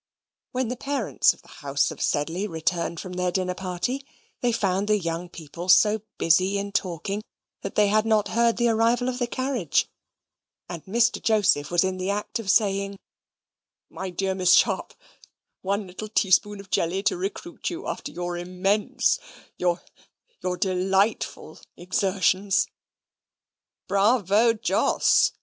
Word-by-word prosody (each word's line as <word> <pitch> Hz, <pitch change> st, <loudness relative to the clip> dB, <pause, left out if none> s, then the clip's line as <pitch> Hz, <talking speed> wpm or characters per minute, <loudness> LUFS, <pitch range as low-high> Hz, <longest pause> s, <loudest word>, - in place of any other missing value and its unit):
When 255 Hz, -2 st, -1 dB
the 250 Hz, -, -2 dB
parents 275 Hz, -3 st, +1 dB
of -, -, -15 dB
the -, -, -21 dB
house 140 Hz, -1 st, 0 dB
of -, -, -9 dB
Sedley 165 Hz, +7 st, 0 dB
returned 170 Hz, -1 st, -2 dB
from 185 Hz, -, -7 dB
their 180 Hz, 0 st, -1 dB
dinner 185 Hz, 0 st, -1 dB
party, 190 Hz, +9 st, -3 dB, 0.4 s
they 245 Hz, -, +1 dB
found 195 Hz, -3 st, 0 dB
the 210 Hz, 0 st, +3 dB
young 170 Hz, -1 st, -4 dB
people 170 Hz, +2 st, -8 dB
so 210 Hz, +3 st, +5 dB, 0.2 s
busy 185 Hz, +4 st, +3 dB
in 200 Hz, 0 st, -3 dB
talking, 195 Hz, +2 st, -2 dB, 0.4 s
that -, -, -6 dB
they 210 Hz, -1 st, +4 dB
had 215 Hz, +1 st, +3 dB
not 220 Hz, -2 st, +2 dB
heard 235 Hz, 0 st, +2 dB
the 240 Hz, 0 st, +2 dB
arrival 230 Hz, +3 st, +2 dB
of 250 Hz, 0 st, -4 dB
the 245 Hz, -, 0 dB
carriage, 255 Hz, -, 0 dB, 0.8 s
and 170 Hz, -3 st, -7 dB
Mr. 235 Hz, +4 st, +2 dB
Joseph 205 Hz, -10 st, +2 dB
was 175 Hz, +1 st, +3 dB
in 190 Hz, 0 st, -1 dB
the 185 Hz, +1 st, -3 dB
act 205 Hz, +3 st, -2 dB
of 215 Hz, -4 st, -5 dB
saying, 200 Hz, -1 st, +2 dB, 0.9 s
"My 190 Hz, 0 st, -5 dB
dear 190 Hz, +1 st, -1 dB
Miss 185 Hz, -1 st, +3 dB
Sharp, -, -, +2 dB, 0.7 s
one 200 Hz, +2 st, -1 dB
little 185 Hz, +4 st, -7 dB
teaspoonful 205 Hz, 0 st, +2 dB
of 195 Hz, -, -18 dB
jelly 185 Hz, +4 st, 0 dB
to 190 Hz, -, +2 dB
recruit 200 Hz, -, -4 dB
you 350 Hz, +2 st, -6 dB
after -, -, -5 dB
your 175 Hz, 0 st, -4 dB
immense 195 Hz, -, 0 dB, 0.4 s
your 175 Hz, -1 st, 0 dB, 0.6 s
your 180 Hz, 0 st, -2 dB
delightful 190 Hz, +3 st, 0 dB, 0.2 s
exertions." 190 Hz, +1 st, +1 dB, 1.2 s
"Bravo, 210 Hz, +2 st, +3 dB
Jos!" 220 Hz, -, +2 dB
195 Hz, 145 wpm, -25 LUFS, 180-215 Hz, 1.2 s, so